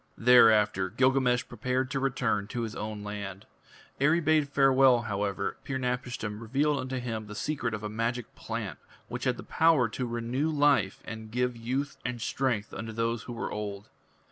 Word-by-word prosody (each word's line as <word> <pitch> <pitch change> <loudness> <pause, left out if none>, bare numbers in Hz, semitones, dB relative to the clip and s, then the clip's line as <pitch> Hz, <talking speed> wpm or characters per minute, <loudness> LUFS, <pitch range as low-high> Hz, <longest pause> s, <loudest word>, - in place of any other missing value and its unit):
Thereafter 110 -5 +5
Gilgamesh 125 +2 +2
prepared 130 +3 -2
to 135 - 0
return 125 -7 0
to 120 +1 -3
his 110 -2 -5
own 105 -1 -5
land. 100 -2 -6 0.5
Ere 145 +4 +4
he - - +2
bade 155 -2 +2
farewell, 135 -3 +5
however, 100 -2 -2
Pir 135 - -3
napishtim 125 -4 -3
revealed 140 +6 +1
unto 130 0 -3
him 115 -3 -4
the 105 - -8
secret 120 -3 -2
of 105 - -8
a - - -2
magic 115 +2 -3
plant - - -5 0.3
which - - -4
had - - -1
power 160 -7 +4
to 125 +2 -3
renew 120 +6 -1
life 145 -10 +2
and 110 -1 -7
give 125 +2 0
youth 130 +5 -3
and 125 -1 -3
strength 120 -3 -1
unto 115 0 -5
those 115 +1 -1
who - - -4
were 120 - -4
old. 105 -1 -5
120 Hz, 170 wpm, -29 LUFS, 110-130 Hz, 0.5 s, Thereafter